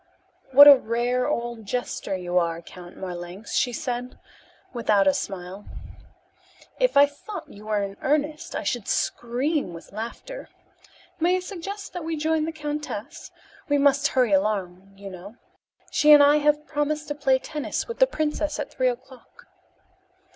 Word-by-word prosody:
"What 285 +2 +10
a 285 - +12
rare 245 +2 0
old 235 -2 -3
jester 245 -4 -3
you 180 0 0
are, 170 -1 -1
Count 175 +1 -12
Marlanx," 180 +2 -7
she 245 - +2
said 245 +1 -4 0.6
without 215 -5 +2
a 190 - +4
smile. 190 +1 -6 1.1
"If - - +2
I 285 - +9
thought 290 +9 -9
you 210 +1 -13
were 210 -1 0
in 195 0 -6
earnest 300 +2 -1
I - - -3
should 240 -5 -2
scream 245 - -1
with 165 - -12
laughter. 235 - -7 0.7
May 350 +3 +3
I - - 0
suggest 395 +2 -7
that 355 - -5
we 325 0 -3
join 315 0 +1
the 325 - -3
countess? 300 -1 -6 0.4
We 290 - +3
must 280 0 +3
hurry 245 -5 +4
along, 195 -1 -1
you 195 0 -9
know. 185 +4 -10 0.6
She 300 - +4
and 295 -1 +9
I 290 +1 +6
have 300 0 +2
promised 300 +1 -2
to - - -1
play 275 -2 +2
tennis 295 +2 -4
with 465 - -7
the - - +6
princess 305 -6 -2
at 295 - -5
three 255 -1 +1
o'clock." 255 +1 -10
255 Hz, 160 wpm, -25 LUFS, 200-300 Hz, 1.1 s, a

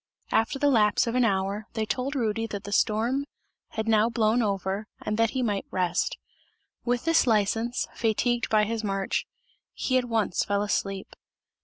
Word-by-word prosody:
After 225 +5 +2
the 285 +1 +3
lapse 210 -2 +4
of 230 - -2
an 250 0 +3
hour, 200 0 0
they 220 -1 -1
told 260 +6 -2
Rudy 225 -3 0
that 205 -3 -6
the 205 - -7
storm 230 +7 +1 0.5
had 220 0 -3
now 220 0 +4
blown 230 0 +2
over 200 0 -1
and 215 - -2
that 230 -1 +4
he 255 +1 -1
might 205 -4 -1
rest; 180 -1 0 0.7
with 245 +1 -1
this 330 -4 +4
license, 225 +2 +1
fatigued 235 +2 0
by 215 -1 +4
his 220 +1 -2
march, 195 -1 -1 0.5
he 255 -1 +1
at 250 - -3
once 225 -6 0
fell 205 0 0
asleep. 195 -1 -2
220 Hz, 170 wpm, -27 LUFS, 205-240 Hz, 0.7 s, lapse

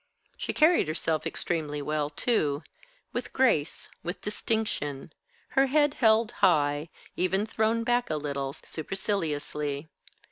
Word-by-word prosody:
She - - -3
carried 315 - +4
herself 155 0 -1
extremely 155 -4 -2
well, 150 0 -1
too: 150 - 0 0.5
with - - -3
grace, 200 - +2
with 175 +1 -4
distinction, 195 -9 -2 0.4
her 270 +1 +3
head 290 +1 +3
held 220 -3 +4
high, 145 -2 +3 0.3
even 190 +3 +1
thrown 225 +1 +1
back 245 0 +1
a - - 0
little, 140 -2 -2
superciliously. 155 -4 -3
165 Hz, 115 wpm, -28 LUFS, 150-225 Hz, 0.5 s, carried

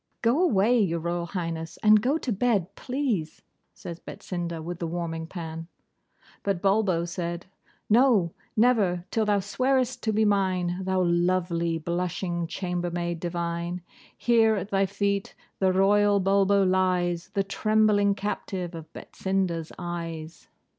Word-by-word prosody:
'Go 240 +8 +3
away, 240 - +3
Your 175 -6 +1
Royal 170 +1 -2
Highness, 165 -2 -4
and 215 0 +7
go 270 +7 +2
to 265 - -3
bed, 205 -4 +1
please,' 250 - -3 0.3
said 170 -1 -8
Betsinda, 170 -2 -5
with 170 +2 -6
the 170 - -2
warming 165 -1 -4
pan. 165 -2 -6 0.7
But 200 -3 -1
Bulbo 195 -3 +2
said, 170 -1 -4 0.4
'No, 215 -7 +4 0.2
never, 205 -7 +3
till 220 -1 +1
thou 205 -1 +2
swearest 255 +5 0
to 220 - 0
be 215 +1 +2
mine, 185 -3 +1
thou 190 -1 +1
lovely, 170 -1 +1
blushing 175 +1 -2
chambermaid 175 -1 -3
divine! 170 +1 -3 0.3
Here, 225 -2 +4
at 195 +1 -4
thy 195 0 +2
feet, 200 0 -1 0.2
the 190 -1 +3
Royal 205 +2 +4
Bulbo 195 +1 +3
lies, 185 -2 +1
the 195 - +2
trembling 205 0 +2
captive 190 -3 -4
of 160 -1 -9
Betsinda's 185 -4 -2
eyes. 170 -2 -6
185 Hz, 135 wpm, -26 LUFS, 170-205 Hz, 0.7 s, and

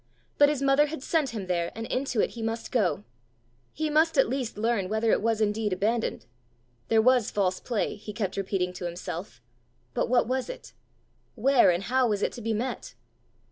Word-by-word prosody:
But 290 0 +7
his 285 -2 -1
mother 275 +2 +4
had 295 -3 -6
sent 310 -4 +1
him 220 -5 -5
there, 175 -2 -1
and 225 +1 -5
into 255 -2 -1
it - - 0
he 235 - -8
must 225 +1 -3
go! 185 - +1 0.7
He 310 +1 -2
must 310 +1 +2
at 270 - +5
least 250 -3 -3
learn 215 -4 0
whether 220 +1 +1
it - - +2
was 225 0 0
indeed 210 -1 0
abandoned! 220 +5 -1 0.6
There 220 -1 +3
was 250 -2 +4
false 190 -2 0
play! 230 -4 -2
he 210 +1 -8
kept 200 -3 -3
repeating 190 -2 -1
to 180 - -6
himself; 170 - -6 0.5
but - - -1
what 245 -2 +3
was 255 +1 -1
it? - - -9 0.6
where 260 0 +4
and 175 +2 +1
how 255 +3 +2
was 205 -2 -1
it - - +1
to 240 - -9
be 225 +1 -2
met? 240 +2 -4
225 Hz, 195 wpm, -27 LUFS, 200-260 Hz, 0.7 s, But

